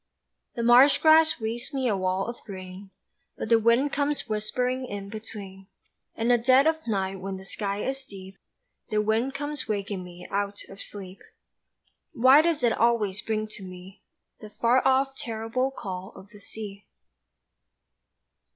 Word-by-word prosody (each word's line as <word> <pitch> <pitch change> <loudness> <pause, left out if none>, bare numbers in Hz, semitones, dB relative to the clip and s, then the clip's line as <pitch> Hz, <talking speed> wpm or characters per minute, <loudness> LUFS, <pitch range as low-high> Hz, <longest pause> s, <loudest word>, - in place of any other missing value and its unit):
The 235 - -2
marsh 245 +4 +7
grass 315 -1 +5
weaves 230 +4 -4
me 260 -2 0
a 215 - +2
wall 185 0 0
of 235 +1 -7
green, 190 -1 -9 0.5
But - - -4
the 230 -1 +6
wind 235 +6 +3
comes 290 0 -1
whispering 250 +4 -1
in 200 -2 -6
between, 200 -3 -8 0.5
In 230 +1 -1
the 240 -1 +5
dead 260 +4 +5
of 320 -3 0
night 195 -3 -1
when 190 +1 -5
the 190 - -11
sky 200 0 -3
is 270 0 -2
deep 195 -4 -11 0.5
The 215 - +1
wind 220 +5 0
comes 290 -2 -4
waking 200 -3 -3
me 180 0 -11
out 200 0 -2
of 195 0 -11
sleep 190 -2 -8 0.9
Why 260 +5 +7
does 325 -3 0
it 235 -2 +4
always 215 -4 +1
bring 215 0 -2
to 210 - -9
me 185 +1 -11 0.4
The 215 - -10
far 240 +4 +2
off, 270 +1 +2
terrible 230 +2 -2
call 190 -6 -7
of 195 - -13
the 210 - -14
sea? 200 -1 -8
220 Hz, 160 wpm, -26 LUFS, 195-255 Hz, 0.9 s, marsh